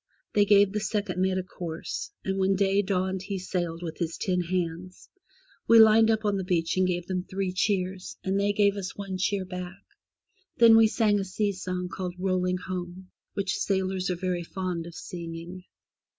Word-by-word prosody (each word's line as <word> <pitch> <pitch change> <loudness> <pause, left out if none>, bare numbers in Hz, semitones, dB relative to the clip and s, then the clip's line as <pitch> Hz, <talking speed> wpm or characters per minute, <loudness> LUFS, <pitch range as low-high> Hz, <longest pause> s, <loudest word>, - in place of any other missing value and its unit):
They 205 -1 +4
gave 200 -1 +5
the 210 - 0
second 210 -3 -2
mate 190 0 +1
a 185 - -1
course, 170 -3 -6 0.2
and 195 0 -1
when 190 0 +3
day 195 +1 +3
dawned 190 -1 -1
he 195 0 -4
sailed 175 -2 -3
with 160 -2 -6
his 165 -1 -2
ten 180 -2 0
hands. 180 0 -4 0.6
We 230 - +7
lined 220 0 +7
up 220 -1 +1
on 205 -1 +1
the 190 - -2
beach, 170 -2 0
and 185 0 +3
gave 175 -1 -1
them 185 -1 -2
three 190 0 -3
cheers, 185 -1 -1
and 190 +1 0
they 200 0 +2
gave 205 -1 +2
us 190 -2 -5
one 195 -2 -5
cheer 195 0 0
back; 180 +1 -7 0.7
then 230 -1 +8
we 225 0 +7
sang 215 -2 +2
a - - -1
sea 200 +2 -1
song 180 -1 -4
called 180 -1 -5
'^Rolling 185 -1 0
Home,*' 185 0 -6 0.2
which 195 -1 -1
sailors 190 -1 0
are 180 - 0
very 180 0 -2
fond 175 -1 -4
of 170 - -11
singing. 170 +1 -7
185 Hz, 190 wpm, -27 LUFS, 180-200 Hz, 0.7 s, then